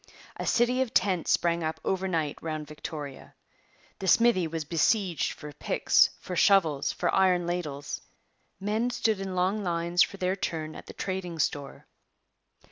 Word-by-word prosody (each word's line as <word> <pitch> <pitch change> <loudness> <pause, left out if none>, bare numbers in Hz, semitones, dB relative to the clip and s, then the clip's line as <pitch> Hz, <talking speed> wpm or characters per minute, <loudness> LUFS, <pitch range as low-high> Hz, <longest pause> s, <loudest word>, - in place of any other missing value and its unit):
A - - -4
city 245 +2 +3
of 255 -3 -2
tents 185 -3 +2
sprang 170 -1 +2
up 155 0 -2
overnight 175 -6 -1
round 155 -2 -4
Victoria. 150 -2 -8 0.6
The 190 - -4
smithy 230 -4 +4
was 160 -1 -4
besieged 170 +1 +1
for 150 -1 -10
picks, - - +3
for 180 - -6
shovels, 170 -6 +3
for 175 - -1
iron 185 -2 +3
ladles. 155 -5 -4 0.6
Men 215 +5 0
stood 220 -4 0
in 190 -1 -4
long 190 +4 +1
lines 170 0 +1
for 200 - +2
their 185 0 0
turn 160 -4 -3
at - - -10
the - - -9
trading 185 -3 -4
store. 145 -2 -2
175 Hz, 150 wpm, -28 LUFS, 155-195 Hz, 0.6 s, smithy